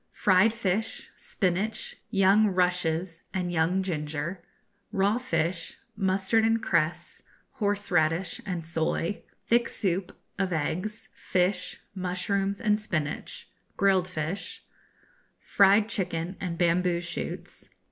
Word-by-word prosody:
Fried 205 +1 +4
Fish, 220 -1 -2
Spinach, 200 +4 -1
Young 195 +2 +5
Rushes, 180 -2 0
and 180 -2 -1
Young 175 +3 +2
Ginger. 160 +1 -3 0.5
Raw 205 +2 +2
Fish, 175 -9 -1 0.2
Mustard 195 +2 +2
and 225 0 +3
Cress, 170 -4 0 0.3
Horseradish, 180 -5 0
and 175 -4 -4
Soy. 165 +3 -1 0.2
Thick 235 0 +3
Soup, 190 -3 -1 0.3
of 190 -2 0
Eggs, 180 +7 -2
Fish, 180 +1 -1
Mushrooms, 195 +2 -1
and 210 -2 +2
Spinach; 155 -8 -3 0.3
Grilled 190 -2 +3
Fish. 180 +2 -4 0.8
Fried 200 +2 +4
Chicken, 180 -4 -2
and 175 -3 -3
Bamboo 175 0 +2
Shoots. 170 - -5
185 Hz, 105 wpm, -28 LUFS, 170-200 Hz, 0.8 s, Young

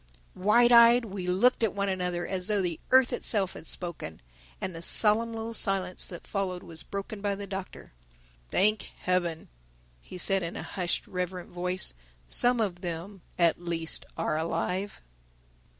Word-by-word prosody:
_ - - -34 0.4
Wide 240 +5 +4
eyed 235 0 +7
we 190 -3 -6
looked 195 +9 +2
at 225 -4 0
one 200 0 -1
another 180 -2 -2
as 185 -1 +2
though 210 -1 +3
the 170 -3 -3
earth 260 -1 +4
itself 200 -6 +1
had - - -11
spoken. 170 - -2 0.4
And 185 - -4
the 165 - -8
solemn 220 +6 +2
little 225 0 -5
silence 195 -4 +3
that 175 - -10
followed 190 -3 -3
was 160 -2 -5
broken 200 +4 -7
by 200 -1 -1
the 200 0 -6
Doctor. 195 -1 -8 0.6
"Thank 215 +3 +1
Heaven," 175 -3 -1 0.5
he 180 - -11
said 195 +2 +4
in 170 -1 -5
a - - -5
hushed 180 -3 -2
reverent 180 -1 -5
voice, 180 - +1 0.3
"some 245 - +5
of 185 -5 -2
them 175 +3 -6 0.2
at 170 -1 +2
least 165 -2 -5
are 155 - -1
alive!" 180 - -3
185 Hz, 165 wpm, -28 LUFS, 175-210 Hz, 0.6 s, eyed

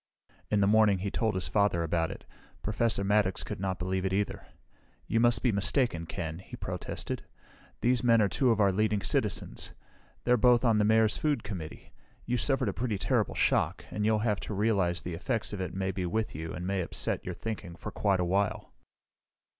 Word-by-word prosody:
In 105 -1 +2
the 100 - +4
morning 105 -1 +5
he 95 +2 -3
told 110 -4 0
his 95 - -1
father 100 -5 +2
about 80 0 0
it. - - -9 0.4
Professor 110 -1 0
Maddox 100 -2 +2
could - - -6
not 95 -1 -2
believe 95 +2 -2
it, 95 - 0
either. 100 +1 -2 0.6
"You 115 - +1
must 120 0 +3
be 125 - +3
mistaken, 100 - +1
Ken," 80 -3 -4
he 95 - -10
protested. - - -4 0.6
"These 125 0 +2
men 115 -2 +5
are 105 - +4
two 130 +6 +1
of 115 -2 +2
our 100 -2 +4
leading 105 +1 +1
citizens. - - -1 0.5
They're 125 0 +4
both 125 +1 +4
on 110 -3 +4
the 105 - +3
Mayor's 110 0 +4
food 145 -6 0
committee. 90 -7 -7 0.3
You 125 +1 0
suffered 135 +2 +1
a - - -3
pretty 115 -4 -2
terrible - - 0
shock, - - +1
and 105 - -2
you'll 110 +1 +3
have 105 -3 +1
to 105 - -5
realize 95 -5 +1
the 90 - -4
effects 105 +6 -2
of 100 - -4
it 90 -1 -4
may 95 0 -1
be 90 -1 -3
with 110 +5 -1
you, 80 +2 -5
and 90 +2 -5
may 95 0 0
upset 85 - -2
your - - -5
thinking, 105 -6 -5
for 105 - -7
quite 100 -3 +1
a 90 - +1
while." 100 +3 -1
105 Hz, 200 wpm, -29 LUFS, 95-110 Hz, 0.6 s, morning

